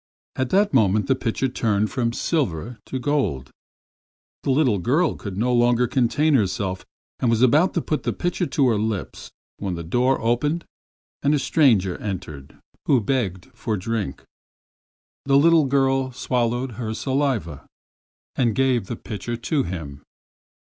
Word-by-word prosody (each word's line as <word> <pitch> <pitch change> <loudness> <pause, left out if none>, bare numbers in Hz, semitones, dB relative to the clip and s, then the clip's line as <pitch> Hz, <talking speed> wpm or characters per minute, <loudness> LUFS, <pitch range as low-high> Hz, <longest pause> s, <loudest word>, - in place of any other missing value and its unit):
In 130 - -1
that 200 +5 +2
moment 105 -4 +3
the 135 - +3
pitcher 130 +1 -1
turned 110 -5 0
from 115 +4 0
silver 120 - -2
to 130 - -3
gold. 130 - -1 0.9
The - - -3
little 130 -7 +3
girl 150 - +2
could 100 -3 -7
no 125 +4 +1
longer 120 0 +3
contain 130 +5 +1
herself 95 -5 0 0.4
and 120 - +1
was 115 +1 +2
about 150 +8 +4
to 170 - 0
put 155 - -1
the - - -1
pitcher 175 0 -2
to 140 -5 +2
her 110 -3 +1
lips, 110 -2 -4 0.3
when 95 -3 -3
the 85 - -5
door 125 +10 +1
opened 145 +9 0 0.6
and 145 +2 +3
a - - +2
stranger 115 - +2
entered 75 -9 -6 0.3
who 135 - +4
begged 110 -2 -2
for 115 -1 -3
a - - -4
drink. 105 -7 -3 1.0
The 135 0 +4
little 160 +1 +5
girl 135 -1 +1
swallowed 120 -1 -1
her 110 -1 -3
saliva 130 - -2 0.7
and 120 -5 +1
gave 130 -6 +1
the 120 - -4
pitcher 115 +2 -5
to 140 +5 0
him. 80 - -6
120 Hz, 155 wpm, -23 LUFS, 105-135 Hz, 1.0 s, little